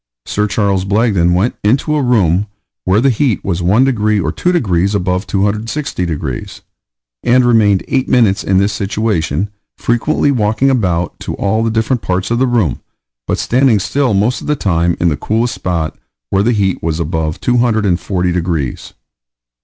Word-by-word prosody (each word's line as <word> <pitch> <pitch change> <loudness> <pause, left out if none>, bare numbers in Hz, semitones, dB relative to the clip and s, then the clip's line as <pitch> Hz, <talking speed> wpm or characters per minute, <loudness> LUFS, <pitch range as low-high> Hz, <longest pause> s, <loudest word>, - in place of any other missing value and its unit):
Sir 105 0 -1
Charles 100 -2 0
Blagden 100 -4 +2
went 100 +7 0
into 135 +8 +1
a 150 - +1
room 105 -6 +2 0.4
where 95 +4 +3
the 135 +1 +3
heat 120 -2 0
was 90 -2 -1
1 100 +9 +3
degree 110 -5 +1
or 80 -4 -1
2 180 - 0
degrees 100 - +1
above 90 0 -1
260 105 +3 -2
degrees, 75 -6 -5 0.6
and 125 +1 +3
remained 105 -5 +3
eight 130 -2 0
minutes 110 -6 +3
in 95 - +1
this 100 +2 +2
situation, 100 -4 -1 0.3
frequently 140 +5 +1
walking 110 +2 +1
about 90 -9 -1
to - - -5
all 110 +3 0
the 115 - +1
different 110 +2 0
parts 95 +3 -2
of 120 - +1
the 130 - +2
room, 115 - 0 0.5
but - - 0
standing 125 -2 +2
still 125 +3 0
most 110 +7 +1
of - - -8
the 150 - +1
time 85 - 0
in 85 - +2
the 75 - 0
coolest 115 - -1
spot, 85 -5 -3 0.4
where 95 - +2
the 115 +4 +2
heat 100 -5 0
was 80 0 -2
above 80 -1 -2
240 105 -7 +1
degrees. 85 -6 -3
105 Hz, 170 wpm, -15 LUFS, 90-120 Hz, 0.6 s, where